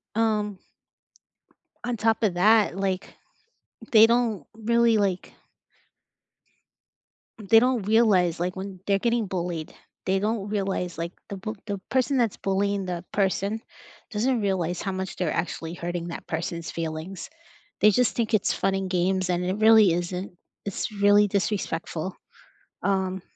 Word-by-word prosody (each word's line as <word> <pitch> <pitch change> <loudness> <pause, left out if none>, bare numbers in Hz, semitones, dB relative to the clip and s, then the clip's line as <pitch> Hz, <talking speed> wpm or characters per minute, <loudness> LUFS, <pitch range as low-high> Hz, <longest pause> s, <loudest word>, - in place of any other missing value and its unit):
Um. 210 -3 0 1.3
On 240 -1 -2
top 225 +1 +1
of 195 -5 +2
that, 210 +1 +4
like, 195 -1 -2 0.8
they 220 0 +9
don't 230 -8 +1
really 235 +1 +3
like 190 -3 -1 2.2
They 225 - +9
don't 250 -2 +1
realize, 195 -7 +3
like, 180 +1 -2
when 190 0 -7
they're 200 -1 +3
getting 235 -1 0
bullied, 175 -4 -4 0.3
they 190 +1 +2
don't 210 0 -2
realize, 195 -4 -2
like, 170 +1 -3 0.2
the 200 - -5
bu 215 +3 -5
the 200 -1 -2
person 260 +1 +1
that's 235 -5 +1
bullying 200 0 0
the 175 -1 -4
person 200 +2 0 0.5
doesn't 235 +2 +1
realize 180 -3 -1
how 195 - -2
much 190 0 -4
they're 175 -4 -1
actually 165 -1 -3
hurting 175 0 -4
that 170 - -7
person's 170 0 -4
feelings. 165 +2 -5 0.5
They 210 - +7
just 250 +4 +2
think 230 -1 -1
it's 210 -2 +2
fun 195 - 0
and 195 -1 -2
games, 185 +1 +1
and 175 0 0
it 185 +2 -1
really 220 -4 +6
isn't. 180 +2 -3 0.3
It's 200 +3 -3
really 205 0 +4
disrespectful. 190 -4 -2 0.7
Um, 190 -1 0
195 Hz, 140 wpm, -25 LUFS, 180-215 Hz, 2.2 s, they